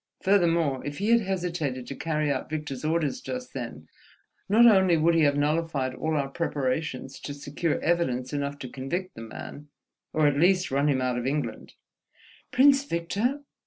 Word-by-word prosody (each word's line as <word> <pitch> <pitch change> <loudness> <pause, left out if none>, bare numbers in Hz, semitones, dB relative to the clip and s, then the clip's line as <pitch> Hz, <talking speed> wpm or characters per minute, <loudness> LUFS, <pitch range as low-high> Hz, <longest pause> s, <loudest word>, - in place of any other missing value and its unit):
Furthermore, 170 -8 +2
if 145 0 -5
he 205 +2 -1
had 235 0 +5
hesitated 175 - -2
to - - -6
carry 155 -1 -1
out 130 - -3
Victor's 150 -4 -4
orders 160 - 0
just 255 0 -6
then, - - -6 0.6
not 225 +4 +6
only 190 -6 +6
would 165 +2 +3
he 165 - +3
have 145 -1 +3
nullified 145 -3 0
all 155 +4 -2
our 140 -1 0
preparations 135 -2 -2
to 145 - -6
secure 145 +3 -2
evidence 130 -7 0
enough 140 0 -2
to 130 - -7
convict 140 +9 -4
the - - -10
man, 130 +6 -9 0.4
or 155 -1 +2
at 145 -1 +3
least 185 0 +3
run 140 +2 +2
him 130 -2 +1
out 125 -1 0
of 120 - -3
England—" 135 -5 -3 0.8
"Prince 275 +1 +5
Victor? 215 +7 -1
155 Hz, 170 wpm, -27 LUFS, 140-180 Hz, 0.8 s, not